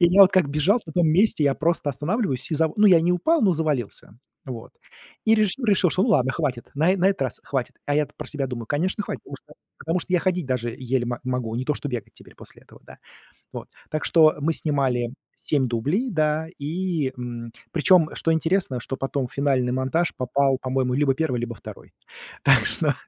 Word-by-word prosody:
и 175 - +7
я 185 +3 +5
вот 190 - +6
как 185 -7 +3
бежал 155 - +2
на 160 - -8
том 175 -1 +2
месте, 175 0 +3
я 140 -1 +3
просто 160 -1 0
останавливаюсь 145 - -2
и - - +2
за 160 +1 +2
ну, 210 0 +5
я 180 -4 +7
не 170 +2 +1
упал, 310 - +2
но 200 - +4
завалился, 145 -10 -3 0.3
вот. 120 -4 -8 0.5
И 220 - +5
режиссер 215 +4 +1
решил, 195 -4 +3
что 185 - +1
ну - - -1
ладно, 130 - +3
хватит, 135 -7 -3
на 160 +6 +3
э - - 0
на 185 +1 +3
этот 195 -8 -1
раз 130 - -4
хватит. 135 -3 -3
А 145 - 0
я-то 150 -1 0
про - - -7
себя 140 -3 -2
думаю: 120 -3 -6
конечно, 180 - -1
хватит, - - -6
потому - - -9
что - - -14 0.2
потому 165 +3 -1
что 185 - -7
я 180 - +3
ходить 180 -4 -1
даже 125 -2 -2
еле 130 -1 -1
мо 120 0 -3
могу, 125 -3 -2
не 125 - -2
то 150 - 0
что 145 - -5
бегать 125 -4 -5
теперь - - -17
после - - -14
этого, - - -18
да. - - -14 0.5
Вот. - - -8 0.2
Так 155 -1 -2
что 155 -2 +5
мы 160 +3 +1
снимали 130 -6 0 0.2
7 140 -4 0
дублей, 145 - -1
да, 155 -2 0
и, 155 -2 -2
мм, 120 -1 -7 0.2
причём, 170 0 +4
что 165 - 0
интересно, 160 -5 0
что 135 - -5
потом 135 -1 -2
в - - -20
финальный 135 -3 +1
монтаж 130 +7 0
попал, 135 +1 +1
по-моему, 130 -1 -1
либо 140 0 +2
первый, 145 -4 -1
либо 120 -1 -4
второй. - - -12 0.5
Так - - +5
что - - 0
150 Hz, 220 wpm, -23 LUFS, 130-175 Hz, 0.5 s, и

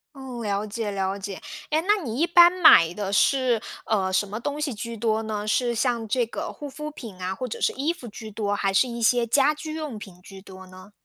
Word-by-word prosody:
嗯， 260 -3 -7
了 205 -1 -1
解 215 0 -4
了 195 0 -2
解， 195 -1 -7 0.3
哎， 310 +1 +2
那 415 -4 +3
你 235 0 -4
一 335 - +3
般 345 0 +7
买 175 - +6
的 200 -1 -4
是， 250 0 +3 0.2
呃， 195 -4 0
什 195 +2 +1
么 215 +3 -6
东 290 +4 -3
西 295 -4 -2
居 230 +2 -6
多 220 0 0
呢？ 210 -1 -4
是 240 +2 +1
像 235 -1 0
这 240 +3 0
个 315 +9 -5
护 290 - -8
肤 300 +2 -7
品 230 -9 -10
啊， 185 +1 -2
或 255 +5 -5
者 225 - -7
是 - - +2
衣 295 +6 -1
服 245 -9 -10
居 220 +1 -9
多， 205 -1 -2
还 195 -1 0
是 250 +6 +3
一 235 0 -6
些 240 +1 +3
家 275 +6 +3
居 310 +1 -7
用 305 -7 -5
品 185 -4 -12
居 195 +1 -12
多 190 -1 -12
呢？ 185 +2 -14
225 Hz, 255 characters per minute, -24 LUFS, 200-270 Hz, 0.3 s, 般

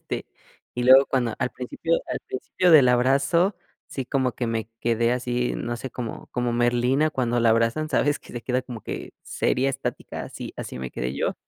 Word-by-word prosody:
Este, - - -5 0.5
y 125 - -3
y - - -1
luego 130 +2 +8
cuando, 120 -4 0
al 125 - -1
principio 165 +6 -2
al - - -3
principio 175 +7 0
del 140 -6 +8
abrazo, 140 - +3 0.3
sí 135 - -4
como 130 -1 0
que 120 +2 -3
me 115 -1 -2
quedé 115 0 +2
así, 125 0 -1
no 120 0 -3
sé, 130 +2 -6
como 120 -2 -6
como 120 -1 -1
Merlina 120 +5 +2
cuando 120 -4 0
la 115 -1 +4
abrazan, 115 +7 +1
¿sabes?, 145 0 +1
que - - -15
se 120 - -5
queda 125 +1 0
como 125 -3 -8
que - - -6
seria, 135 +2 0
estática, 135 - -5
así - - -8
así - - -6
me 65 -1 -5
quedé 60 +2 -3
yo. - - -1
125 Hz, 200 wpm, -24 LUFS, 120-135 Hz, 0.5 s, luego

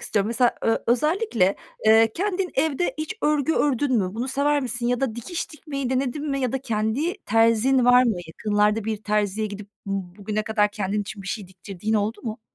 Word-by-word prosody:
istiyorum. 200 -1 0
Mesela 235 +2 +2
ö 225 - +3
özellikle, 245 - +2 0.3
eee, 220 0 +6
kendin 385 -1 -1
evde 310 +4 0
hiç 310 +7 -3
örgü 300 0 +2
ördün 270 -3 +2
mü? 185 -1 -2
Bunu 240 +4 -3
sever 285 +2 +1
misin 240 -1 -3
ya 245 0 +1
da 265 -5 -1
dikiş 285 +9 -5
dikmeyi 275 -4 -5
denedin 270 +3 -1
mi 275 - -1
ya 255 -3 -1
da 270 - 0
kendi 230 - -1
terzin 230 +4 +3
var 245 0 +7
mı? 235 -3 +2
Yakınlarda 210 +5 +1
bir 220 0 -1
terziye 210 0 0
gidip 205 0 -8 0.2
bugüne 195 +2 -3
kadar 210 -1 +1
kendin 205 0 -2
için 205 0 -7
bir - - -11
şey 200 -2 -4
diktirdiğin 190 +3 -4
oldu 215 +1 -1
mu? 225 -1 -5
225 Hz, 185 wpm, -24 LUFS, 210-270 Hz, 0.3 s, var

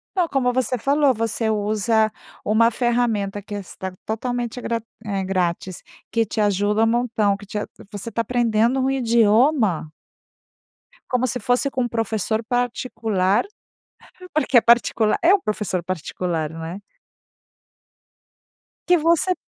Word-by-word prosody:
Não, 355 -3 +1
como 250 -3 +1
você 255 0 0
falou, 280 +3 +3
você 225 0 -1
usa 215 +1 +1 0.4
uma 230 +2 +4
ferramenta 225 -4 0
que 205 - -10
está 190 -1 -6
totalmente 245 +2 -3
grat 230 -1 -2 0.2
eh, 200 -3 -2
grátis, 185 -1 -2 0.3
que 230 0 +1
te 215 - -5
ajuda 205 +1 +2
um - - +2
montão 225 -4 +1
que 205 - -11
te 210 - -6
a 210 - -3 0.2
você 205 +3 -6
tá 230 +1 -1
aprendendo 235 +1 +1
um 260 0 +1
idioma 230 - +2 1.2
como 250 0 +1
se 250 0 -3
fosse 245 +5 +1
com 255 - -1
um - - 0
professor 225 -1 -1
particular, 225 -5 0 0.9
porque 300 -4 +3
é 235 - +7
particular, 230 -2 +3
é 355 +4 +6
um 400 - +3
professor 205 -4 -2
particular, 170 -2 -3
né. 165 +3 -6 2.1
Que 355 -1 +5
você 335 +3 +2
225 Hz, 135 wpm, -22 LUFS, 205-245 Hz, 2.1 s, é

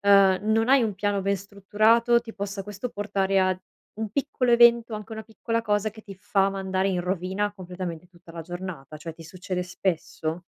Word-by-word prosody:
ehm, 195 -2 +6
non 225 +2 +3
hai 270 -2 +6
un 215 -3 -1
piano 200 0 0
ben 200 +1 +1
strutturato, 215 +5 +3
ti 230 -2 -10
possa 200 -1 -4
questo 205 +4 -5
portare 195 -3 0
a 185 -1 +2 0.4
un 220 - -1
piccolo 260 0 0
evento, 235 -1 +6
o - - -2
anche 210 0 -9
a - - -5
una 220 - -6
piccola 230 +1 -2
cosa, 210 -1 0
che 220 - -13
ti 200 -3 -10
fa 195 +1 +1
mandare 190 0 -1
in 185 -2 0
rovina 190 +3 -1
completamente 180 -3 -6
tutta 175 -2 -17
la 165 - -6
giornata, 175 -4 -7
cioè 165 +2 -7
ti 165 - -13
succede 180 +1 -4
spesso? 175 -2 -3
195 Hz, 200 wpm, -26 LUFS, 185-215 Hz, 0.4 s, ehm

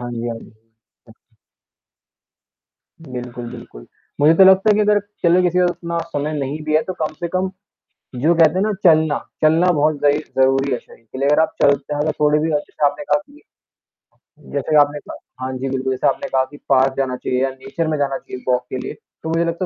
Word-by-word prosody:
हाँ 120 0 -5
जी, 120 0 -4
हाँ 115 -1 -4
जी। - - -15 0.6
अच्छा। - - -22 1.7
बिल्कुल, 125 -1 -7
बिल्कुल। 115 - -11 0.3
मुझे 155 +3 +6
तो 190 - +7
लगता 190 +3 +6
है - - +5
कि 215 - +2
अगर, 210 0 +3 0.2
चलो 175 +1 +4
किसी 180 0 +1
को 180 - +4
उतना 170 -1 -4
समय 145 +2 -2
नहीं 140 +3 -3
भी 155 0 -1
है 155 - +4
तो 185 - -5
कम 155 - -2
से 170 - -2
कम 185 +1 0 0.7
जो 165 +3 +4
कहते 160 -1 +5
हैं 185 - 0
ना 215 +1 +1
चलना, 155 -3 +4 0.2
चलना 165 +4 +4
बहुत 155 -1 +2
ज़ई 145 0 +3 0.2
ज़रूरी 135 +1 +3
है 125 - +1
शरीर 115 - -20
के - - -8
लिए, 140 +1 0
अगर 150 - +4
आप - - 0
चलते 140 +1 +2
हैं 145 - -3
मतलब 155 - 0
थोड़े 150 0 +3
भी 160 +1 -1
अच्छे 150 0 -2
से 150 - +1
आपने 220 - -1
कहा 290 - +1
कि 295 +1 -19 1.1
जैसे 145 +2 -1
आपने 145 0 +2
कहा 130 -2 -10
हाँ 130 - -4
जी, 135 +1 -3
बिल्कुल 130 0 -2
जैसे 130 - 0
आपने 185 - -1
कहा 130 -1 +2
कि 145 - -11
पार्क 130 0 +3
जाना 130 -2 -1
चाहिए 125 0 -2
या 135 - +1
नेचर 155 +5 -4
में 155 -1 -1
जाना 135 -1 -1
चाहिए 130 -1 -10
वॉक 125 0 +1
के 130 - -4
लिए, - - -5 0.3
तो 160 - -4
मुझे 165 +1 +1
लगता 170 +2 -2
150 Hz, 225 wpm, -19 LUFS, 130-170 Hz, 1.7 s, तो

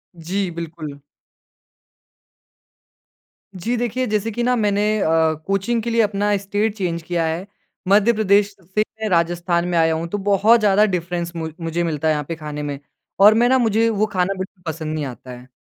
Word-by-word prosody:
जी, 180 +3 -2
बिल्कुल। 160 -3 -7 2.6
जी 225 +7 -2
देखिए, 245 +2 -1
जैसे 215 +1 -1
कि 240 +3 -2
ना 250 0 +2
मैंने 205 -2 +1 0.2
अ, - - +1 0.4
कोचिंग 195 +4 0
के 235 - -2
लिए 230 0 +3
अपना 205 -1 +1
स्टेट 205 +2 -1
चेंज 170 -3 -2
किया 170 -1 -1
है। 170 +5 -3 0.4
मध्य 210 +4 +4
प्रदेश 205 -1 +2
से 190 +5 -2 0.2
मैं 215 - -1
राजस्थान 170 0 +1
में 175 -1 0
आया 160 0 +3
हूँ, 165 +1 -3
तो 205 +5 -3
बहुत 205 +4 +4
ज़्यादा 210 0 +4
डिफ़रेंस 175 -2 -2
मु 160 -1 -3
मुझे 165 +1 -1
मिलता 160 -2 -1
है 155 - +4
यहाँ 150 -1 -2
पे 165 - -3
खाने 150 -1 -6
में 145 -1 -4 0.4
और 210 +2 +8
मैं 240 +2 +3
ना 260 - +4
मुझे 230 -1 +2
वो 215 -1 +1
खाना 185 +1 +1
बिल्कुल 190 0 -8
पसंद 155 -1 -5
नहीं 150 -2 -2
आता 125 0 -9
है। 125 +1 -11
190 Hz, 185 wpm, -21 LUFS, 165-210 Hz, 2.6 s, और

